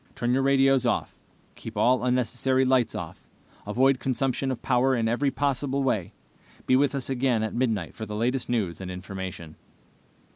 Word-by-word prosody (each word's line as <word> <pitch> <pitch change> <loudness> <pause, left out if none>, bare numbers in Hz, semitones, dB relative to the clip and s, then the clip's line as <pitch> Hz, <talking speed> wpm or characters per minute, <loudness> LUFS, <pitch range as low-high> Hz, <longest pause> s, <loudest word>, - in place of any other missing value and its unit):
Turn 120 0 0
your 135 - +2
radios 135 -1 +3
off. 120 - -1 0.4
Keep - - -9
all 125 0 +3
unnecessary 125 +1 +1
lights 130 -3 +2
off. - - -7 0.4
Avoid 130 +5 +3
consumption 135 0 -1
of 130 -3 -4
power 130 +1 +2
in 115 -2 0
every 125 +5 +1
possible 140 0 -1
way. 110 -9 -1 0.5
Be 130 - +3
with 140 +1 +2
us 135 -2 -3
again 125 -4 +1
at 110 - -3
midnight 110 -8 -1
for 110 - -7
the 105 - -5
latest 125 +4 -1
news 100 -8 -1
and 95 - -6
information." 90 -3 -7
125 Hz, 170 wpm, -26 LUFS, 110-135 Hz, 0.5 s, radios